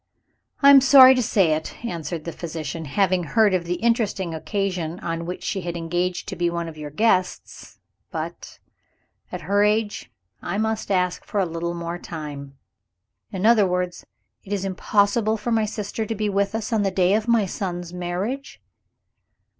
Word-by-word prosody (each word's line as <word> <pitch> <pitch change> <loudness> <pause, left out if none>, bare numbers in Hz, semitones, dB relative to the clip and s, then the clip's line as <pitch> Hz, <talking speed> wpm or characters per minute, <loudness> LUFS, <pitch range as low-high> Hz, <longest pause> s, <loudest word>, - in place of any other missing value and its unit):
"I 280 - +9
am 275 -1 +9
sorry 260 -1 +9
to 255 - +1
say 195 -7 +2
it," 155 +9 -5
answered 165 -5 -4
the 170 - -4
physician 160 -1 -6
"having 185 +4 +1
heard 205 +6 +3
of 180 -2 0
the 175 +1 -1
interesting 205 -4 0
occasion 180 -1 -3
on 165 0 -4
which 180 - -5
she 195 - -2
had 175 -1 -4
engaged 175 +2 -2
to - - -5
be 175 -1 0
one 170 0 -3
of 165 - -8
your 150 -1 -7
guests 185 +2 -1 0.3
but, - - -6 0.7
at - - -5
her 205 +1 +2
age, 210 0 0 0.3
I 195 - -3
must 220 0 -1
ask 180 -2 0
for 205 - -3
a 195 - +2
little 170 +1 -4
more 170 0 -5
time." 145 -5 -8 0.7
"In 190 0 -3
other 220 -3 +5
words, 180 -1 -2 0.4
it 195 - -12
is 195 -2 -1
impossible 205 +3 +1
for 220 +3 -4
my 220 -1 +2
sister 215 +1 -4
to 225 - -3
be 210 0 -1
with 200 +1 0
us, 225 +1 -3
on 220 - +2
the 200 - +1
day 185 0 +2
of 215 +2 0
my 230 -3 +3
son's 175 -2 -5
marriage?" 185 +10 -4
185 Hz, 180 wpm, -23 LUFS, 170-215 Hz, 0.7 s, I